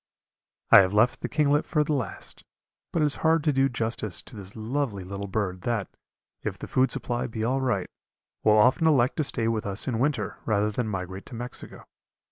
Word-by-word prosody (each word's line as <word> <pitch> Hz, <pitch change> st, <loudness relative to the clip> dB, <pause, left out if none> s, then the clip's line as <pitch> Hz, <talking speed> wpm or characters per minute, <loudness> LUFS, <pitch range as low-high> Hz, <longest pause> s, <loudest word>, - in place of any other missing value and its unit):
I -, -, +11 dB
have 95 Hz, +1 st, 0 dB
left 110 Hz, +4 st, +3 dB
the -, -, -3 dB
kinglet 150 Hz, 0 st, +2 dB
for 150 Hz, -2 st, +1 dB
the 150 Hz, -, -1 dB
last, 130 Hz, -6 st, -5 dB, 0.5 s
but 160 Hz, -, +1 dB
it -, -, +4 dB
is 145 Hz, -, +4 dB
hard 160 Hz, -1 st, +3 dB
to 150 Hz, -, +2 dB
do 135 Hz, 0 st, +3 dB
justice 110 Hz, -6 st, -1 dB
to 125 Hz, -, -10 dB
this 100 Hz, -1 st, -7 dB
lovely 115 Hz, -2 st, -2 dB
little 100 Hz, +2 st, -6 dB
bird 95 Hz, -3 st, -2 dB
that, 115 Hz, -2 st, -3 dB, 0.5 s
if -, -, -4 dB
the -, -, -7 dB
food 130 Hz, +1 st, +2 dB
supply 120 Hz, 0 st, -2 dB
be 110 Hz, -2 st, -4 dB
all 130 Hz, +4 st, 0 dB
right, 110 Hz, -8 st, 0 dB, 0.6 s
will 110 Hz, 0 st, +5 dB
often 130 Hz, +9 st, +4 dB
elect 130 Hz, -5 st, +3 dB
to 155 Hz, -, +1 dB
stay 115 Hz, -4 st, -1 dB
with 110 Hz, -2 st, -1 dB
us 100 Hz, +1 st, 0 dB
in 120 Hz, -4 st, -1 dB
winter 135 Hz, -4 st, -1 dB
rather 105 Hz, -1 st, +1 dB
than 115 Hz, +2 st, -2 dB
migrate 95 Hz, -1 st, -5 dB
to -, -, -9 dB
Mexico. 120 Hz, +2 st, -8 dB
115 Hz, 205 wpm, -26 LUFS, 105-135 Hz, 0.6 s, I